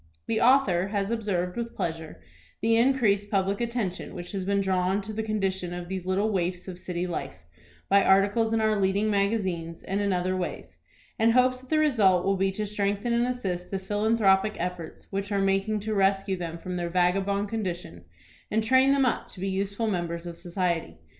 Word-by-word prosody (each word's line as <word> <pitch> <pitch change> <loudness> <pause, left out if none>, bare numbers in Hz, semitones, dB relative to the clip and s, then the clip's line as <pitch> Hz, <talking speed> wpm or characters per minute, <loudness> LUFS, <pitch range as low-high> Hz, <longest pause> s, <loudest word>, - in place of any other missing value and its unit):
The 220 - 0
author 220 -9 +4
has 200 0 -2
observed 190 -6 -1
with 235 -1 -4
pleasure 160 -1 -5 0.4
the 225 +2 +2
increased 225 -5 +2
public 200 +1 0
attention 235 -6 -3
which 175 0 -7
has 195 -2 -3
been 200 +1 +1
drawn 190 0 +1
to 215 +2 -7
the 220 - -2
condition 195 -5 -2
of 175 0 -7
these 190 -1 -4
little 200 +4 +1
waifs 180 -1 -2
of 180 -1 -7
city 180 -1 -3
life, 170 - -5 0.5
by 200 0 +5
articles 200 +4 +3
in 225 -1 +1
our 215 0 +2
leading 200 +2 +1
magazines, 190 -5 -1
and 195 +2 -2
in 200 -1 +1
other 185 0 0
ways; 185 -1 -5 0.4
and 225 +1 +4
hopes 255 0 +3
that 260 - -16
the 315 - +2
result 215 -12 +3
will 195 0 +2
be 195 0 +1
to 210 +2 -3
strengthen 205 +2 -1
and 235 +1 +2
assist 190 -8 -3
the 195 - -2
philanthropic 205 0 +2
efforts 175 -2 -5
which 200 +1 -3
are 200 - +1
making 195 +2 +1
to 215 +1 -3
rescue 195 -1 +2
them 170 -2 -5
from 180 +2 -5
their 175 -1 -2
vagabond 195 +3 +1
condition, 180 - -4 0.5
and 220 +1 +1
train 260 +4 +4
them 275 -1 +3
up 245 - 0
to - - -13
be 195 +1 -2
useful 200 +3 -2
members 175 -4 -2
of 170 -1 -6
society. 170 - -2
195 Hz, 195 wpm, -27 LUFS, 180-215 Hz, 0.5 s, by